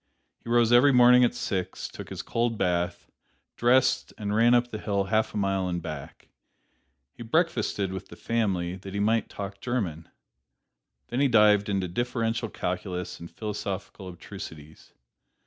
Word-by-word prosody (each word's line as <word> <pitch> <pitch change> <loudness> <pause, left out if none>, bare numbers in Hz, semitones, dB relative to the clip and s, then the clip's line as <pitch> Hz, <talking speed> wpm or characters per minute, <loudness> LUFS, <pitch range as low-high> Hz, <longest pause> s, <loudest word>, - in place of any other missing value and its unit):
He - - -9
rose 120 -1 +4
every 125 +4 +7
morning 125 0 +7
at 120 - +2
six, 95 -2 -3
took - - -10
his - - -6
cold 115 -1 -1
bath, 90 -2 -1 0.5
dressed 130 +2 +2
and 105 -1 -3
ran 115 +3 +5
up 120 0 +1
the 110 - -5
hill 100 -2 0
half 110 +3 0
a - - -1
mile 95 -2 0
and 85 -1 -2
back. 75 -4 -8 0.8
He - - -14
breakfasted 115 - 0
with 95 - -6
the - - -12
family, 95 -5 -1
that 95 +1 -9
he - - -1
might 110 +2 +1
talk 100 0 -7
German. 95 -11 -3 1.0
Then 120 - -2
he 140 - +4
dived 105 -4 +4
into 95 -2 0
differential 115 +3 -2
calculus 90 -1 -4
and 85 - -9
philosophical 100 -3 -5
abstrusities. 80 -2 -11
105 Hz, 155 wpm, -27 LUFS, 95-120 Hz, 1.0 s, every